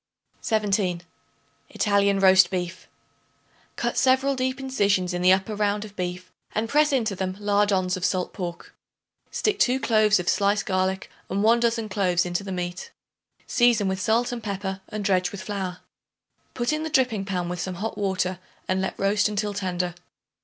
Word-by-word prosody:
17. 200 -5 0 0.7
Italian 200 -1 +2
Roast 190 -2 +6
Beef. 180 -1 -4 0.9
Cut - - -1
several 265 +1 +3
deep 260 +1 -1
incisions 200 -9 +1
in 175 - -2
the 180 +1 +6
upper 190 +3 +2
round 205 0 0
of 205 -1 -13
beef 180 0 -5 0.2
and 220 +1 0
press 300 +4 +3
into 230 -7 0
them 185 0 -3
lardoons 200 -2 +1
of 185 - -6
salt 185 -1 0
pork. 175 -2 -6 0.6
Stick 415 -1 -1
2 260 -5 +3
cloves 215 -4 +3
of 175 - -5
sliced 200 +2 +2
garlic 190 +1 -1 0.2
and 195 +2 -1
1 230 +2 +5
dozen 230 -1 0
cloves 185 -3 +1
in 175 - -4
the 195 +2 -2
meat; 180 0 -4 0.6
season 240 -5 +3
with 190 0 -2
salt 230 +5 +1
and 240 -1 -4
pepper 195 -2 -4
and 210 -1 -5
dredge 185 -2 +2
with 195 -2 -7
flour. 190 -3 -4 0.7
Put 240 +4 0
in 305 - -1
the 320 - -3
dripping 250 -9 +1
pan 180 -3 -2
with 175 0 -4
some 185 0 -3
hot 215 +5 -4
water 185 -2 -1 0.3
and 185 0 0
let 190 - -3
roast 205 +1 +2
until 205 0 -2
tender. 180 -3 -2
200 Hz, 170 wpm, -25 LUFS, 185-220 Hz, 0.9 s, Roast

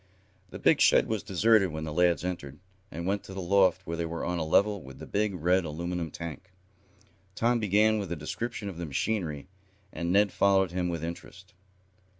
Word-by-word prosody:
The - - -8
big - - +3
shed - - +5
was 110 -3 -1
deserted 100 +1 +3
when 80 -1 -5
the 80 -1 -5
lads 90 +1 +2
entered, 70 -6 -5 0.3
and 85 -1 -6
went 100 +2 -1
to 95 - -9
the - - -5
loft 95 0 +2
where 85 -1 -4
they 85 - -1
were 85 0 -4
on 90 0 -1
a - - -1
level 100 +5 +2
with 65 -2 -12
the - - -9
big, 105 -1 -1
red 90 +2 +2
aluminum 85 +1 -4
tank. 85 +5 -8 0.8
Tom 120 +1 +2
began 110 +1 +3
with 95 -4 -5
a - - -1
description 105 +8 -5
of 95 -4 -6
the 85 -1 -5
machinery, 75 -1 -2 0.5
and 85 0 -2
Ned 100 +1 +4
followed 95 -2 +3
him 90 0 -1
with 85 -2 -4
interest. 90 +3 -8
90 Hz, 195 wpm, -28 LUFS, 85-100 Hz, 0.8 s, shed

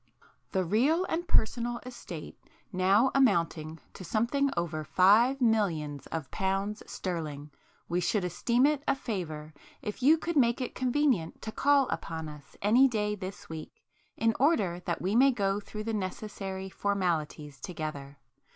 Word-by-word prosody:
"The 190 -2 0
real 275 - +2
and 345 +2 -2
personal 235 +2 +1
estate 210 -10 -8 0.4
now 195 +8 +4
amounting 165 - +1
to - - -9
something 235 - +1
over 160 -2 -2
Five 215 - +4
Millions 175 - 0
of 160 -4 -5
Pounds 195 +2 -1
Sterling, 150 -5 -5 0.4
we 175 +1 0
should 180 +3 0
esteem 235 - +2
it 295 -1 +2
a - - +3
favour 160 - -5 0.3
if 210 +4 -5
you 300 +6 +6
could 340 +1 -3
make 240 -3 +3
it 255 - -3
convenient 255 - +1
to 220 - -4
call 280 +2 +3
upon 160 -1 -4
us 150 -2 -13
any 240 +6 +6
day 210 -4 -1
this 195 -1 -7
week 160 -1 -7 0.5
in 225 0 +2
order 225 - +2
that 170 - -2
we 195 +4 0
may 265 +3 +6
go 200 -5 0
through 215 +1 -7
the 225 +1 -3
necessary 195 -1 -4
formalities 165 -8 -2
together. 145 -4 -6
200 Hz, 150 wpm, -29 LUFS, 170-240 Hz, 0.5 s, you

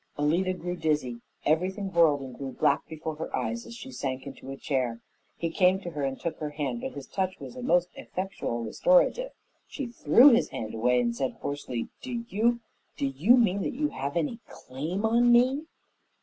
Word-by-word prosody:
Alida 170 +6 +1
grew 175 0 -4
dizzy; 150 -8 -1 0.2
everything 190 +5 0
whirled 160 -4 +4
and 130 -2 -8
grew 135 -1 -5
black 145 +2 +2
before 160 -1 -5
her 160 - -4
eyes 235 0 -3
as 235 - -9
she 265 +3 -9
sank 130 - -4
into 135 -1 -9
a 135 - -6
chair. 125 -5 -1 0.4
He 165 -1 -2
came 185 +2 +4
to 175 - -6
her 150 -3 -4
and 135 -1 -2
took 170 - -4
her 150 - -3
hand, 140 -5 -3
but - - -4
his 140 -2 -7
touch 190 -1 -2
was - - -9
a 255 - -7
most 180 -7 +2
effectual 180 -11 -4
restorative. - - +3 0.4
She 280 - -5
threw 240 - +6
his 235 +1 +3
hand 110 -1 -5
away 125 +2 +2
and 120 -1 0
said 130 +1 -1
hoarsely, 140 -4 -4
"Do 240 -2 -4
you 235 +3 +1 0.4
do - - 0
you 155 - +4
mean 200 -5 +3
that - - -2
you 300 +2 0
have 140 - -3
any 170 +8 -1
claim 160 +11 -4
on 235 +2 +4
me?" 260 +6 +4
170 Hz, 195 wpm, -28 LUFS, -, 0.4 s, threw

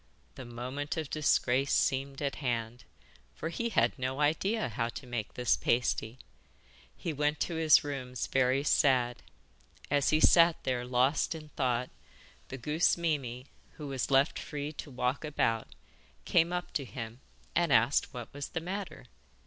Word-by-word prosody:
The 130 - -9
moment 130 +6 -5
of 155 -3 -4
disgrace 135 -3 +2
seemed 135 +1 0
at 140 - -2
hand, 120 -3 -3 0.5
for 160 - -4
he 235 +7 -2
had 220 - +1
no 130 +2 -2
idea 175 - +1
how 115 +1 -2
to 130 - -8
make 120 -4 -5
this 125 -1 +2
pasty. 120 -1 0 0.8
He 165 - -3
went 150 +1 0
to 175 - -1
his 160 -1 +5
rooms 130 -4 -4
very 130 +1 +2
sad. 125 -4 +2 0.7
As 145 -1 +3
he 155 - +3
sat 170 0 +6
there 125 -1 -1
lost 130 +6 +1
in 155 -1 -10
thought 125 -3 -1 0.6
the 135 - -7
goose 150 +9 +2
Mimi, 135 -7 -2 0.3
who 150 -2 -8
was 135 -2 -2
left 135 +2 +3
free 145 0 -5
to 145 - -8
walk 125 +2 -1
about, 115 -7 0 0.6
came 170 0 +3
up 180 0 -3
to 140 - -1
him 115 -1 -7 0.4
and 170 -3 +2
asked 120 +3 +3
what 120 -3 -8
was 145 0 -5
the 165 - -3
matter? 185 -2 -6
135 Hz, 155 wpm, -31 LUFS, 125-155 Hz, 0.8 s, sat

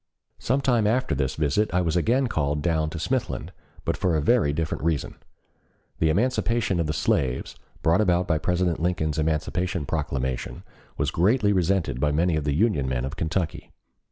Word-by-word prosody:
Some 130 +4 0
time 120 -6 +2
after 125 - +1
this 70 -1 -1
visit 80 +8 +1
I 90 - +3
was 85 -2 0
again 120 +10 +2
called 75 - -1
down 80 -2 +1
to 85 - -7
Smithland, 125 +8 -2 0.3
but - - 0
for 90 -3 0
a - - +2
very 75 -2 +3
different 80 +1 -2
reason. 80 -3 -1 0.8
The 80 - +3
emancipation 110 0 +1
of 80 - 0
the - - 0
slaves, 65 -4 0 0.3
brought 85 +5 +4
about 90 -3 +2
by 80 -3 +1
President 90 0 0
Lincoln's 80 -3 0
Emancipation 80 +2 -1
Proclamation, 65 -1 -3 0.3
was - - 0
greatly 105 +4 +3
resented 90 -8 0
by 75 +1 +2
many 85 +3 +2
of 75 -2 -2
the 70 -1 0
Union 80 - +1
men 65 -1 -1
of 70 +3 -5
Kentucky. 80 0 -3
85 Hz, 175 wpm, -25 LUFS, 75-100 Hz, 0.8 s, brought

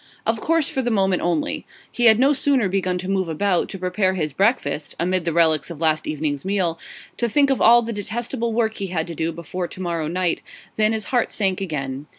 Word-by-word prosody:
Of 225 -1 0
course 330 -2 +2
for 265 - -1
the 245 - -1
moment 195 -4 +1
only. 170 -3 -1 0.3
He 240 - 0
had 220 -2 +7
no 270 +4 +4
sooner 270 -5 +2
begun 185 -1 -1
to 180 +1 -6
move 190 -3 0
about, 180 +3 0
to - - -6
prepare 185 +1 0
his 155 -5 -2
breakfast 175 - 0
(amid 180 +1 0
the 170 - +1
relics 160 -2 +2
of 170 -4 -8
last 155 -1 +1
evening's 150 -2 -2
meal), 185 -4 -1 0.4
to 235 - 0
think 280 +3 +3
of 270 - 0
all 240 +1 +6
the 230 0 -4
detestable 230 +3 -3
work 220 -1 0
he 195 - -3
had 170 -3 -2
to 170 - -7
do 160 +1 -2
before 170 +2 -5
to - - -11
morrow 170 -4 -2
night, 175 +1 -1 0.3
than 215 0 +2
his 220 -2 -2
heart 245 - +2
sank 195 -3 0
again. 140 -5 -4
185 Hz, 220 wpm, -22 LUFS, 165-220 Hz, 0.4 s, had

